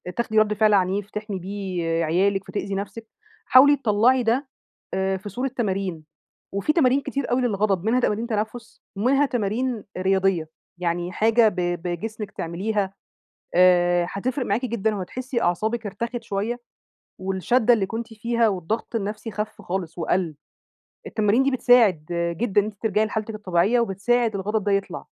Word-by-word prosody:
تاخدي 220 Hz, -2 st, +1 dB
رَدّ 215 Hz, 0 st, +3 dB
فعل 215 Hz, 0 st, +3 dB
عنيف 195 Hz, +1 st, +1 dB
تحمي 210 Hz, -2 st, -4 dB
بيه 190 Hz, -1 st, -4 dB, 0.2 s
عيالِك 195 Hz, +4 st, +1 dB
فتأذي 200 Hz, 0 st, -3 dB
نفسِك، 205 Hz, +3 st, -6 dB, 0.4 s
حاولي 280 Hz, +3 st, +7 dB
تطلعي 245 Hz, +1 st, +3 dB
ده 245 Hz, +5 st, +1 dB, 0.5 s
آآ 190 Hz, 0 st, 0 dB
في 195 Hz, +2 st, -8 dB
صورة 250 Hz, +7 st, -2 dB
تمارين، 190 Hz, -7 st, -2 dB, 0.5 s
وفي 200 Hz, +9 st, +1 dB
تمارين 275 Hz, -4 st, +3 dB
كتير 275 Hz, -1 st, -3 dB
أوي 250 Hz, +1 st, +2 dB
للغضب، 200 Hz, -5 st, 0 dB
منها 235 Hz, +3 st, +3 dB
تمارين 225 Hz, -1 st, 0 dB
تنفس، 220 Hz, +1 st, -4 dB, 0.2 s
ومنها 270 Hz, +7 st, +3 dB
تمارين 240 Hz, -1 st, -1 dB
رياضية، 190 Hz, -3 st, +1 dB, 0.3 s
يعني 175 Hz, 0 st, -1 dB
حاجة 225 Hz, +2 st, +4 dB
ب 205 Hz, -, -11 dB, 0.3 s
بجسمِك 205 Hz, +4 st, -4 dB
تعمليها، 195 Hz, +3 st, -2 dB, 0.6 s
آآ 175 Hz, -1 st, +4 dB
هتفرق 250 Hz, +5 st, -2 dB
معاكِ 220 Hz, +6 st, 0 dB
جدًا 220 Hz, -2 st, -1 dB
وهتحسّي 245 Hz, +6 st, -3 dB
أعصابِك 215 Hz, +6 st, 0 dB
ارتخت 235 Hz, +4 st, -4 dB
شوية، 225 Hz, +3 st, -2 dB, 0.6 s
والشّدّة 215 Hz, +6 st, +2 dB
اللي 205 Hz, -4 st, 0 dB
كنتِ 225 Hz, +2 st, -6 dB
فيها، 230 Hz, +1 st, +1 dB
والضغط 205 Hz, +5 st, -3 dB
النفسي 215 Hz, +1 st, -4 dB
خف 210 Hz, +2 st, -5 dB
خالص 180 Hz, -2 st, -4 dB
وقَل، 170 Hz, -2 st, 0 dB, 0.7 s
التمارين 215 Hz, +4 st, +2 dB
دي 275 Hz, -, +2 dB
بتساعد 235 Hz, -, +4 dB, 0.3 s
جدًا 205 Hz, -1 st, +2 dB
إن -, -, -4 dB
أنتِ 215 Hz, -1 st, -6 dB
ترجعي 215 Hz, -1 st, +2 dB
لحالتِك 220 Hz, 0 st, -4 dB
الطبيعية، 200 Hz, +3 st, +2 dB
وبتساعد 230 Hz, +2 st, +1 dB
الغضب 210 Hz, +2 st, -1 dB
ده 205 Hz, -, 0 dB
يطلع، 195 Hz, 0 st, -2 dB
210 Hz, 150 wpm, -24 LUFS, 190-235 Hz, 0.7 s, حاولي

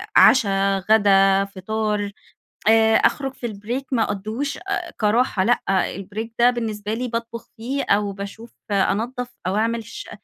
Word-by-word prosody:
عشا، 195 Hz, -5 st, +5 dB
غدا، 195 Hz, -2 st, +5 dB
فطار، 205 Hz, +1 st, -2 dB, 0.6 s
آآ 220 Hz, 0 st, +5 dB
أخرج 270 Hz, -2 st, +1 dB
في 255 Hz, -, -8 dB
البريك 230 Hz, +5 st, -4 dB
ما 230 Hz, -3 st, +3 dB
أقضّيهوش 215 Hz, +8 st, -3 dB
آآ 385 Hz, -1 st, -4 dB
كراحة 215 Hz, -2 st, +2 dB
لأ، 245 Hz, +4 st, +2 dB, 0.3 s
البريك 210 Hz, +4 st, -6 dB
ده 240 Hz, +1 st, +6 dB
بالنسبة 220 Hz, -3 st, -3 dB
لي 250 Hz, +3 st, -2 dB
باطبخ 230 Hz, -1 st, -5 dB
فيه، 260 Hz, +5 st, -3 dB
أو 205 Hz, 0 st, +1 dB
باشوف 200 Hz, +4 st, -9 dB, 0.2 s
أنضَّف 230 Hz, +5 st, 0 dB, 0.2 s
أو 185 Hz, -, 0 dB
أعمل 230 Hz, +2 st, 0 dB
ش 225 Hz, -, -9 dB
220 Hz, 140 wpm, -22 LUFS, 200-240 Hz, 0.6 s, ده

